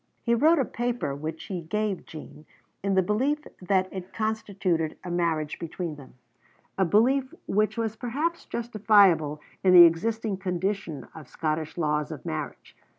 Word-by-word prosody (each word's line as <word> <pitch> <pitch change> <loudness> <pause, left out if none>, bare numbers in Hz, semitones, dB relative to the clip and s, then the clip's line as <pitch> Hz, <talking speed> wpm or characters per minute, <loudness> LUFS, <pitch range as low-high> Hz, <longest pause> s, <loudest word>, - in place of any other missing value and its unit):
He 235 - +2
wrote 310 +8 +5
a 270 - +2
paper 240 - -2
which 155 +3 -5
he 185 -3 -5
gave 210 +3 -2
Jean, 155 -1 -11 0.3
in 195 0 0
the 190 - +4
belief 265 +10 0 0.2
that 185 0 +1
it 190 -1 -7
constituted 195 -7 -1
a 180 - -5
marriage 165 -3 -1
between 170 0 -4
them, 135 -3 -14 0.6
a 190 - +2
belief 255 +8 +3
which 215 +3 +1
was 225 -1 -1
perhaps 295 +9 -2
justifiable 200 -10 +3 0.2
in 185 -1 +5
the 175 -1 +11
existing 215 +5 0
condition 185 -4 -3
of 155 -4 -11
Scottish 155 0 -3
laws 150 -1 0
of 155 - -8
marriage. 80 - -6
190 Hz, 150 wpm, -26 LUFS, 160-220 Hz, 0.6 s, the